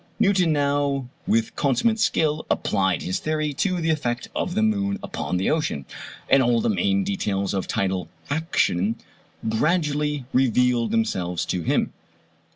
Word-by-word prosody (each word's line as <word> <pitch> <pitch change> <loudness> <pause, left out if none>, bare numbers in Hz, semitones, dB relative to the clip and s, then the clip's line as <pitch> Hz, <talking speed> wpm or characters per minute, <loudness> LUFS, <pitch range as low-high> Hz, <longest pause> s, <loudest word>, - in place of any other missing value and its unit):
Newton 195 -6 +3
now 140 -2 +1 0.2
with 115 0 +1
consummate 150 - +1
skill 155 -6 +1
applied 95 -4 +1
his 90 - -2
theory 155 -1 -1
to 180 +6 0
the 165 -1 +1
effect 125 -6 -2
of 180 - -2
the 220 - +2
moon 200 -2 +1
upon 90 - -3
the 95 - +1
ocean, 155 - -1 0.4
and 135 - +5
all 120 -2 +3
the 220 - +1
main 200 -2 +1
details 105 - -1
of 95 -2 -2
tidal 95 -3 -1 0.2
action 130 - +1 0.5
gradually 150 +2 0
revealed 125 -1 +3
themselves 90 - -1
to 90 - -2
him. - - 0
145 Hz, 145 wpm, -24 LUFS, 110-175 Hz, 0.5 s, and